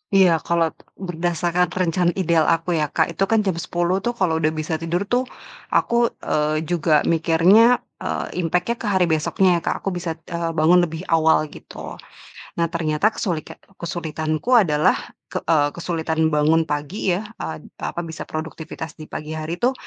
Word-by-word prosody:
Iya, 180 -4 +5
kalo 165 +1 +1 0.2
berdasarkan 175 0 0
rencana 175 0 +1
ideal 170 -4 +2
aku 165 +1 +1
ya 150 - +1
Kak, 160 +2 0
itu 195 - -1
kan 225 +1 +3
jam 190 -4 -1
10.00 175 +2 0
tuh 240 +4 -2
kalau 175 -7 +1
udah 155 0 +2
bisa 155 0 -2
tidur 170 +3 -1
tuh 245 +5 0 0.4
aku, 235 0 +2 0.2
eee, 155 +1 0
juga 160 -2 +2
mikirnya, 175 +9 +4 0.2
eee, - - -3
impact-nya 180 +6 0
ke 220 - -4
hari 190 -3 +3
besoknya 175 +3 +2
ya - - -18
Kak, - - +1
aku - - 0
bisa, 175 -2 -3 0.2
eee, 170 -1 -1
bangun 170 +3 +5
lebih 165 +3 -7
awal 160 -1 +3
gitu. - - -10 0.6
Nah 170 - +3
ternyata 165 +6 +1
kesulika 170 -7 -3 0.2
kesulitanku 160 +2 -3
adalah, 150 -3 +2 0.3
k - - -2
eee, 150 -3 +3
kesulitan 160 0 -3 0.2
bangun 160 +2 +3
pagi 150 +6 -1
ya, 190 - -2 0.2
eee, 160 - -5 0.2
apa, - - -4
bisa 160 -2 -7
produktivitas 160 0 -6
di 155 - -9
pagi 150 +1 -7
hari 155 +2 -3
tuh, 255 +2 +4
165 Hz, 165 wpm, -22 LUFS, 160-180 Hz, 0.6 s, Iya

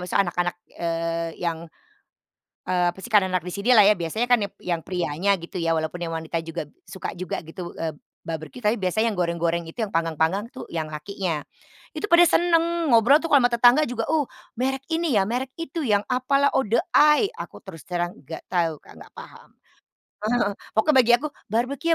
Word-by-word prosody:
maksudnya 190 +2 +2
anak-anak, 175 0 -1 0.2
eee, 165 0 -2 0.2
yang, 165 -1 -1 1.1
eee, 180 -1 +1
apa - - -21
sih - - -6
karena 200 -3 +5
anak 180 -3 0
di 180 - -5
sinilah 215 +1 +5
ya 210 - +6
biasanya 180 +7 -2
kan 245 -1 +4
yap 200 - -4
yang 170 -2 -1
prianya 180 +2 0
gitu 170 +2 -7
ya 165 - +1
walaupun 160 +2 -3
yang 165 - -3
wanita 165 +1 -3
juga 165 -1 -5 0.2
suka 190 - -6
juga 180 -1 -4
gitu, 175 +1 -7
eee, 160 -2 -3 0.3
barbeque, 160 +5 -6
tapi 210 +2 +3
biasanya 220 +5 +1
yang 180 - -10
goreng-goreng 170 0 0
itu - - -21
yang 200 - -13
panggang-panggang 165 +6 0
tuh - - -9
yang 155 -1 -3
lakinya. 165 0 -3 0.5
Itu 415 - -3
pada 340 +1 +8
seneng 335 -2 +2
ngobrol 240 +6 +6
tuh 330 - -4
kalo 285 - +7
ama - - -1
tetangga 245 +6 +5
juga, 235 -2 -3
uh, 305 -4 +2 0.3
merek 265 +1 -1
ini 325 -4 0
ya, - - +4
merek 255 +3 -3
itu, 330 0 -4
yang 205 -3 +3
apalah 275 +3 +2
Outdoor 235 -3 +2
Eye, 300 +7 +5
aku - - -8
terus 165 -5 -11
terang 175 -1 -2
nggak 160 - -8
tahu, 165 -4 0
Kak, - - -17
nggak - - -14
paham. - - -12 0.8
Heeh. 240 -3 +1 0.2
Pokoknya 265 +6 +3
bagi 240 -1 +4
aku 300 +5 -4 0.2
barbeque 255 +9 0
200 Hz, 190 wpm, -24 LUFS, 170-250 Hz, 1.1 s, pada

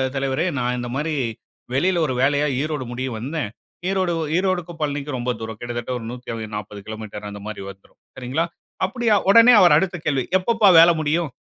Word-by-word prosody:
தலைவரே 135 +3 0
நான் 125 0 0
இந்த 120 0 -4
மாரி 155 +3 -1 0.6
வெளில 175 +7 +2
ஒரு 130 - -1
வேலையா 145 +2 +2
ஈரோடு 150 -4 -3
முடிய 130 +2 -3
வந்தேன்" 135 -1 -3 0.4
ஈரோடு, 190 -2 0
வ - - -2
ஈரோடுக்கும் 180 -3 -1
பழனிக்கும் 145 -1 -2
ரொம்ப 125 +1 -1
தூரம். 110 -1 -6
கிட்டத்தட்ட 120 0 -5
ஒரு 115 - -8
140 110 -4 -6
கிலோமீட்டர் 110 -1 -7
அந்த 100 0 -8
மாரி 110 -2 -6
வந்துரும். 95 0 -15 0.2
சரிங்களா? 130 +6 -1 0.4
அப்டியா, 230 +1 +1
உடனே 230 +4 +8
அவர் 180 - +7
அடுத்த 190 -2 0
கேள்வி 135 -3 +1
"எப்பப்பா 220 +2 +2
வேல 170 +1 +8
முடியும்?" 155 +1 0
140 Hz, 170 wpm, -22 LUFS, 120-175 Hz, 0.6 s, உடனே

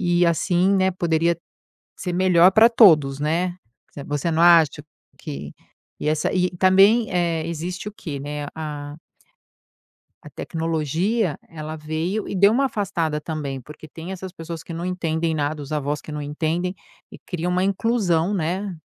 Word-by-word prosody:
e 175 -1 +2
assim, 175 +3 +2
né, 190 0 +3
poderia 170 -1 +1 0.6
ser 180 - -3
melhor 180 0 +5
para 220 +2 +7
todos, 155 - +5
né. 175 +4 0 0.5
Você 145 +3 -1
não 165 +1 +1
acha 165 -4 +5 0.4
que, 70 +1 -7 0.5
e 150 - -1
essa, 155 0 0
e 180 -1 +1
também, 195 +5 +5
eh, 170 -3 0
existe 180 +4 -4
o 210 - -10
quê, 150 -9 -7
né, 145 0 -5
a 150 -2 -6 1.3
a - - -11
tecnologia 165 - -1
ela 155 -1 -7
veio 160 +7 -3
e - - -4
deu 200 +2 +5
uma 275 +4 +2
afastada 175 - -1
também 145 -4 -4
porque 150 +3 -12
tem 165 +5 -9
essas 190 -1 -7
pessoas 165 -1 -7
que - - -10
não 170 +2 -4
entendem 165 -3 -1
nada, 150 0 -2
os 140 - -11
avós 150 0 -1
que 155 - -10
não 150 0 -4
entendem, 160 +5 -2 0.4
e - - -10
cria 180 -1 -2
uma 180 +1 +1
inclusão, 195 -3 +1
né, 185 +2 -2
170 Hz, 160 wpm, -22 LUFS, 155-185 Hz, 1.3 s, para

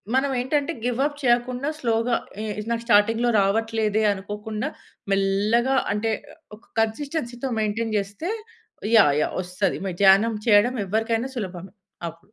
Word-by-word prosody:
మనం 270 +1 +2
ఏంటంటే 285 +4 0
give 245 +1 -1
up 290 -1 -3
చేయకుండా 245 +3 +1
స్లోగా 230 -1 +1 0.3
ఇ - - -3 0.2
ఇది 210 - -6
నాకు 230 0 -1
స్టార్టింగ్‌లో 225 +2 +3
రావట్లేదే 220 +1 +1
అనుకోకుండా 210 +2 -5 0.4
మెల్లగా 205 +6 +2 0.2
అంటే 215 +2 0 0.4
ఒ - - -6
ఒక 220 - -22
కన్సిస్టెన్సీతో 245 +2 -2
మెయింటైన్ 215 +1 -1
జేస్తే 205 - -4 0.7
యాహ్! 150 -10 +6
యాహ్! - - -1
వస్తది 180 +2 -2
మ 190 - -2
ధ్యానం 205 +4 +6
చేయడం 220 +4 +5
ఎవ్వరికైనా 225 +5 0
సులభమే 185 -2 -6 0.3
అవును. 165 0 -9
225 Hz, 135 wpm, -24 LUFS, 205-245 Hz, 0.7 s, యాహ్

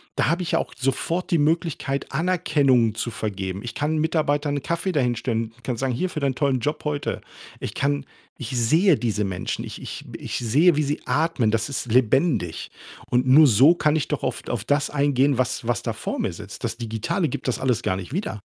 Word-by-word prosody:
Da - - +1
habe 170 +3 +1
ich 170 - -3
ja - - +3
auch - - -4
sofort 135 +8 -1
die 170 - +4
Möglichkeit, 150 -3 -1
Anerkennung 145 -8 +2
zu 120 +1 -3
vergeben. 95 -3 -4
Ich 115 0 -7
kann 155 +2 0
Mitarbeitern 150 -2 +1
'n 140 - -5
Kaffee 170 +3 -1
da 145 - +2
hinstellen. 115 -2 -1
Ich 125 - -24
kann 125 - -2
sagen: 130 +3 -1
„Hier, 185 +10 -1
für 155 - -5
deinen 135 -2 0
tollen 135 -2 +1
Job 150 +6 -2
heute.“ 145 -1 -2 0.4
Ich - - -5
kann 140 0 0 0.3
ich 120 - -6
sehe 160 - +4
diese 105 -3 -1
Menschen. 95 -2 -3
Ich - - -8
ich - - -7
ich - - -4
sehe, 145 +8 +4
wie 155 - +2
sie 145 +2 -2
atmen. 150 -8 +1
Das 115 0 0
ist 130 -4 -4
lebendig 130 - +1 0.4
und 125 +1 +2
nur 145 +4 +8
so 135 +8 +6
kann 150 -2 +2
ich 150 - -1
doch 150 - -3
auf 130 - -3
auf 115 -3 -2
das 145 +3 +1
eingehen, 140 -2 +2
was 125 -2 -1
was 120 -3 0
da - - -1
vor - - -4
mir - - 0
sitzt. - - -10
Das - - -2
Digitale 120 - -1
gibt 130 - -5
das - - -1
alles 125 -4 +1
gar 95 - 0
nicht 95 +6 -7
wieder. 175 - -3
135 Hz, 215 wpm, -23 LUFS, 120-155 Hz, 0.4 s, nur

